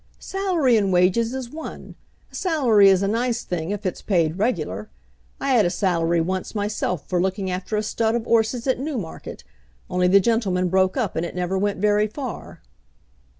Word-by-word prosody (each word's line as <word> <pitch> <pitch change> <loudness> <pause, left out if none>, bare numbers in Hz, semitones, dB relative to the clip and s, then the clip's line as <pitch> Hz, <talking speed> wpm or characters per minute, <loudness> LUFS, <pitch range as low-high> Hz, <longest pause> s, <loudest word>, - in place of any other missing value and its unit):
"Salary 355 - +1
and 200 -3 +1
wages 185 +6 +3
is 260 -2 -5
one. 320 +1 -8 0.4
A - - -29
salary 245 - +4
is 190 0 +3
a - - +1
nice 235 +2 -1
thing 170 -1 -4
if 205 0 -4
it's 185 - -3
paid 170 -3 0
regular. 155 - -2 0.5
I 275 - -1
had 240 -5 +5
a 175 - +2
salary 170 -2 +1
once 185 +5 -3
myself 205 -6 -2
for 180 -2 0
looking 190 0 -1
after 185 +4 -3
a 210 - 0
stud 225 +1 0
of 235 -1 -2
'orses 230 +1 +1
at 260 -2 +1
Newmarket, 255 - -6 0.5
only 180 0 +2
the 195 +2 +6
gentleman 190 -4 +1
broke 190 +3 +2
up 220 -9 -1
and 160 - -1
it 170 - -5
never 180 +1 -2
went 200 +1 0
very 210 +1 +2
far." 250 +2 -7
205 Hz, 185 wpm, -23 LUFS, 180-235 Hz, 0.5 s, the